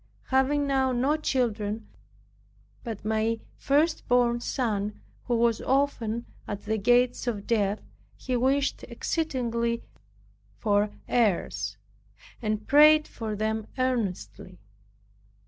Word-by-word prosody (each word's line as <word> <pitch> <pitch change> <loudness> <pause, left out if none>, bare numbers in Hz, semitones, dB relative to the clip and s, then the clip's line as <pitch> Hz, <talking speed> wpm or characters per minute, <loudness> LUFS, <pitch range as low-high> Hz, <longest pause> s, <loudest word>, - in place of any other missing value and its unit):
Having 275 +2 +2
now 265 -1 +2
no 260 +5 +2
children 225 -7 -1 1.0
but 220 -4 -6
my 220 +1 0 0.2
first 305 +4 +1
born 240 -1 +3
son, 215 -5 -2 0.3
who 240 - +1
was 230 -1 +2
often 240 -4 0 0.2
at 205 -1 -5
the 220 0 0
gates 245 +4 +3
of 210 -4 -2
death, 210 -3 0 0.3
he 255 - -2
wished 270 +3 +1
exceedingly 235 -7 -2 0.7
for 205 -1 +2 0.2
heirs, 220 -7 0 0.6
and 215 -1 -2
prayed 305 +1 +7
for 220 -2 -5
them 220 +1 -2
earnestly. 220 -7 -2
235 Hz, 105 wpm, -27 LUFS, 215-265 Hz, 1.0 s, prayed